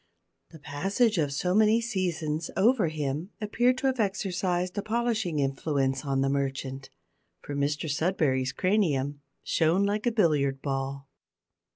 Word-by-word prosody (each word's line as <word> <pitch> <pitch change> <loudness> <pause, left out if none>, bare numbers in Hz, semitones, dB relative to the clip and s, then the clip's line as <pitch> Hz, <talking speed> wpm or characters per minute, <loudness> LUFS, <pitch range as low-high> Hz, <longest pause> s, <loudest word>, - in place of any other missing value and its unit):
The 165 - -13
passage 190 - 0
of 145 -3 +1
so 180 +6 0
many 215 +2 +5
seasons 175 -8 -2
over 215 -1 +4
him 155 +2 -3
appeared 240 +4 +1
to 270 - -4
have 260 -2 +1
exercised 185 -3 -1
a 205 - -1
polishing 220 -6 -1
influence 135 -1 0
on 135 -2 0
the 135 - +2
merchant, 135 -1 -3 0.5
for 145 - -6
Mr 145 +2 -1
Sudberry's 145 -4 +1
cranium 145 -7 0 0.2
shone 165 +4 +2
like 210 +3 0
a - - +3
billiard 150 - +2
ball. 135 0 -3
165 Hz, 140 wpm, -28 LUFS, 140-205 Hz, 0.5 s, many